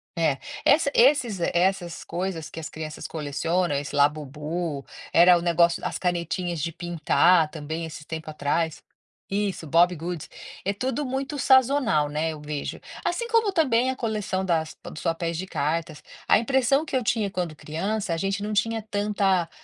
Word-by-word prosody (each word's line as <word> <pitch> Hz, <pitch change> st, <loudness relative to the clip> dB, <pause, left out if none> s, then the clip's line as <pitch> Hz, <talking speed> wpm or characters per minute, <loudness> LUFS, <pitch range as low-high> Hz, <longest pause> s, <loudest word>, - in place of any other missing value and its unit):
É. 160 Hz, -5 st, +1 dB, 0.3 s
Essa 285 Hz, -1 st, +4 dB
esses 245 Hz, -6 st, +4 dB
essas 175 Hz, 0 st, 0 dB
coisas 175 Hz, -3 st, -4 dB
que -, -, -8 dB
as 160 Hz, -, -6 dB
crianças 155 Hz, -1 st, -6 dB
colecionam, 160 Hz, +2 st, -1 dB
esse 145 Hz, +1 st, -3 dB
Labubu, 150 Hz, +1 st, -1 dB, 0.3 s
era 175 Hz, +1 st, +7 dB
o -, -, -3 dB
negócio 170 Hz, 0 st, +2 dB
as -, -, -2 dB
canetinhas 175 Hz, -1 st, -1 dB
de 165 Hz, -, -2 dB
pintar 175 Hz, 0 st, +3 dB
também 160 Hz, +2 st, -5 dB
esses 155 Hz, -1 st, -9 dB
tempo 160 Hz, 0 st, -6 dB
atrás. 155 Hz, +2 st, -1 dB, 0.5 s
Isso, 195 Hz, -5 st, -2 dB
Bobbie 175 Hz, +4 st, +4 dB
Goods. 170 Hz, 0 st, -5 dB, 0.3 s
É 200 Hz, -, 0 dB
tudo 260 Hz, +7 st, -2 dB
muito 270 Hz, +3 st, -3 dB
sazonal, 260 Hz, -, +4 dB
né, 155 Hz, +2 st, -1 dB
eu 155 Hz, -, -8 dB
vejo. 150 Hz, -1 st, -4 dB, 0.2 s
Assim 355 Hz, +7 st, -1 dB
como 450 Hz, -3 st, +3 dB
também 260 Hz, -7 st, +2 dB
a 260 Hz, -, -1 dB
coleção 210 Hz, -5 st, -2 dB
das 160 Hz, -3 st, 0 dB
dos -, -, -8 dB
papéis 165 Hz, 0 st, -1 dB
de 185 Hz, -, -3 dB
cartas. 155 Hz, -2 st, -2 dB, 0.3 s
A -, -, +6 dB
impressão 265 Hz, +4 st, +2 dB
que 305 Hz, -, -4 dB
eu 255 Hz, -, +1 dB
tinha 215 Hz, -2 st, +1 dB
quando 175 Hz, -4 st, -3 dB
criança, 190 Hz, +6 st, -2 dB
a -, -, -1 dB
gente 195 Hz, +3 st, -1 dB
não 210 Hz, +1 st, -3 dB
tinha 225 Hz, +2 st, +1 dB
tanta, 205 Hz, -4 st, 0 dB
175 Hz, 165 wpm, -25 LUFS, 160-215 Hz, 0.5 s, era